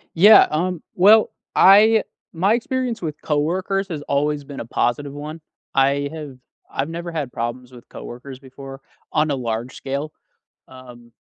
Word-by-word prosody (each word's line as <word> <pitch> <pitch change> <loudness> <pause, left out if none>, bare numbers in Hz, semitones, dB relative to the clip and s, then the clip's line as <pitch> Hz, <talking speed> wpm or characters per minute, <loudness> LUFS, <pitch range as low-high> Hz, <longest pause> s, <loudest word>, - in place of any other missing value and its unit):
Yeah. 205 +6 +8
Um. 175 +2 -2
Well, 210 +4 +6 0.3
I 215 +3 +6 0.3
my 190 +6 +2
experience 255 -1 -2
with 155 -4 -5
coworkers 185 +6 -1
has 155 -4 -5
always 145 +1 -1
been 140 -1 -8
a - - -7
positive 120 +5 -1
one. 150 +3 -8 0.3
I 140 +1 +2
have 150 -5 -8 0.3
I've 135 +3 -3
never 170 +1 -6
had 150 -6 -4
problems 120 +2 -5
with 120 -1 -15
coworkers 130 +2 -10
before 135 0 -11 0.3
on 155 0 +1
a 145 - 0
large 120 -1 -4
scale. 140 +3 -5 0.6
Um, 125 -2 -14
145 Hz, 150 wpm, -21 LUFS, 135-175 Hz, 0.6 s, Yeah